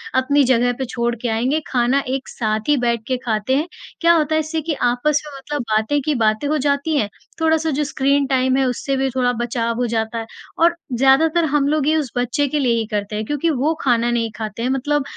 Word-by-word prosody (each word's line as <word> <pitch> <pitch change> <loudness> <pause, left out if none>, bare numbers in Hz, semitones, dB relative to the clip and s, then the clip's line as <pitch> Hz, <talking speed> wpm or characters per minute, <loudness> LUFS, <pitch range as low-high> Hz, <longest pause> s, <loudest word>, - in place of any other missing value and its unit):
अपनी 280 +2 +3
जगह 245 0 +3
पे 265 - -1
छोड़ 235 -1 -2
के 245 - -1
आएँगे, 245 +7 +1
खाना 250 +2 +2
एक 265 +1 -3
साथ 215 +1 -2
ही 295 - +4
बैठ 235 -1 +1
के 255 - 0
खाते 220 +2 0
हैं। 300 +5 0 0.3
क्या 340 0 +5
होता 315 -2 +1
है - - +3
इससे 315 +1 -2
कि 315 +1 -2 0.2
आपस 290 +4 +1
में 290 -2 -9
मतलब 290 +1 -4
बातें 220 +7 +2
की 305 - +1
बातें 220 +2 +1
हो 305 +1 +1
जाती 285 +2 +1
हैं, 210 -7 0 0.3
थोड़ा-सा 320 0 +2
जो - - +2
स्क्रीन 280 0 +1
टाइम 260 0 +2
है, 270 - +2
उससे 260 +2 -1
भी 265 0 0
थोड़ा 250 -1 +2
बचाव 235 -1 -1
हो 245 0 0
जाता 225 +1 -1
है। 225 - -5 0.4
और 340 0 +4 0.2
ज़्यादातर 290 +7 +3
हम 280 -1 +2
लोग 295 -1 +1
ये 310 - +3
उस 285 -6 -2
बच्चे 250 +4 0
के 295 +2 -1
लिए 250 -4 +2
ही 225 - -2
करते 210 0 -2
हैं 215 +1 -3
क्योंकि 295 +6 -1
वो 295 +1 +1
खाना 240 -2 +2
नहीं 230 -2 -1
खाते 215 0 -5
हैं 250 - 0
मतलब 285 +2 0
265 Hz, 235 wpm, -20 LUFS, 235-295 Hz, 0.4 s, क्या